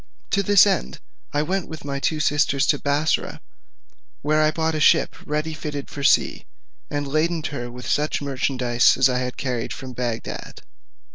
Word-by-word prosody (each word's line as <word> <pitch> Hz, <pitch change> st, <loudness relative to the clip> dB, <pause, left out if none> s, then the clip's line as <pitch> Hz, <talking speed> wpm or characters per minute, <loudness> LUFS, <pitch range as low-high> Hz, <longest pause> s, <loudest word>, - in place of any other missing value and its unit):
To 200 Hz, -, +3 dB
this 200 Hz, 0 st, +6 dB
end, 65 Hz, -, -1 dB, 0.3 s
I 145 Hz, 0 st, +1 dB
went 185 Hz, +3 st, -2 dB
with 160 Hz, -3 st, -9 dB
my 140 Hz, -1 st, -3 dB
two 155 Hz, +2 st, 0 dB
sisters 145 Hz, -2 st, +2 dB
to 145 Hz, -, +2 dB
Bussorah, 145 Hz, +2 st, 0 dB, 0.8 s
where 155 Hz, +1 st, +2 dB
I 155 Hz, -, +4 dB
bought 160 Hz, +1 st, -1 dB
a 155 Hz, -, -1 dB
ship -, -, +4 dB
ready 150 Hz, +2 st, -2 dB
fitted 150 Hz, -2 st, -6 dB
for 140 Hz, -, -6 dB
sea, -, -, +2 dB, 0.4 s
and 145 Hz, -1 st, -2 dB
laded 160 Hz, +2 st, 0 dB
her 120 Hz, -4 st, -5 dB
with 125 Hz, +1 st, -9 dB
such 150 Hz, +1 st, 0 dB
merchandise 130 Hz, -3 st, +2 dB
as 130 Hz, 0 st, +5 dB
I 125 Hz, 0 st, 0 dB
had 125 Hz, 0 st, -4 dB
carried 125 Hz, -4 st, -3 dB
with -, -, -8 dB
me -, -, -10 dB
from 130 Hz, -1 st, -8 dB
Bagdad. 120 Hz, -2 st, -5 dB
145 Hz, 185 wpm, -23 LUFS, 130-155 Hz, 0.8 s, this